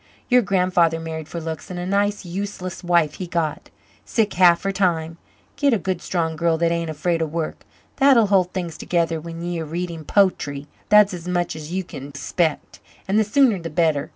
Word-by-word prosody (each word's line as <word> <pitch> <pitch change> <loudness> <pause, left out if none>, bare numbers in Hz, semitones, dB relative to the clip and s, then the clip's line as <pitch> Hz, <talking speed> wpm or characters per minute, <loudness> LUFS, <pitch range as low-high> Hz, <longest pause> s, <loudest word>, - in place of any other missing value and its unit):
Your 250 0 +6
grandfather 180 -4 +2
married 160 -1 -6
for 170 - -5
looks, 160 -1 -6
and 180 -1 -5
a 175 - -4
nice 200 +1 0
useless 185 0 -5
wife 170 -4 +2
he 185 - -5
got 165 -3 -2 0.3
sick 220 -3 0
half 175 -2 +5
her 195 - 0
time. 170 -4 0 0.4
Git 280 -4 +3
a - - +1
good 185 -2 -3
strong 165 -3 -1
girl 165 0 +1
that 170 0 +1
ain't 170 -1 -1
afraid 165 +2 -1
of 160 -2 -2
work, 165 -1 -4 0.3
that'll 270 -5 +6
hold 190 -3 +2
things 175 -4 -4
together 165 -2 0
when 165 +1 -7
ye're 175 -1 -3
reading 165 +1 -5
po'try 150 -7 +1 0.2
that's 210 -1 +6
as 175 -1 -7
much 175 -2 -1
as 155 0 -8
you 190 +1 -1
kin 140 -5 -9
expect. 150 +3 -2 0.3
And 200 +3 +2
the - - +4
sooner 225 -1 +3
the 165 -1 -6
better. 155 -2 +1
175 Hz, 195 wpm, -22 LUFS, 165-190 Hz, 0.4 s, Your